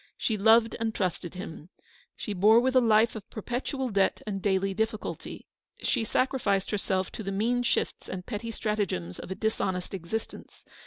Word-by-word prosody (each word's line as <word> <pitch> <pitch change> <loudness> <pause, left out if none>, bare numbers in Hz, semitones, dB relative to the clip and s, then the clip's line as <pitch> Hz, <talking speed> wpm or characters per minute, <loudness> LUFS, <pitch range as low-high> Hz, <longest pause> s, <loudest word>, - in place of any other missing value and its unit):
She 220 - 0
loved 225 +2 +5
and 225 -1 -1
trusted 180 -2 -2
him. 175 -3 -8 0.5
She 210 - -4
bore 210 +4 +6
with 260 +2 +1
a 255 - +7
life 225 0 +4
of 210 -2 -8
perpetual 255 +4 -3
debt 195 -3 +2
and 195 -2 -3
daily 195 0 +1
difficulty. 220 +1 -3 0.3
She 240 - 0
sacrificed 220 -5 +1
herself 190 -2 0
to - - -6
the 195 -2 -3
mean 230 +5 +1
shifts 245 - -1
and 180 -1 -5
petty 230 0 -4
stratagems 205 - -2
of - - -8
a 190 - -3
dis 220 +2 -1
honest 180 -1 -2
existence. 195 +4 -6
210 Hz, 170 wpm, -28 LUFS, 190-230 Hz, 0.5 s, a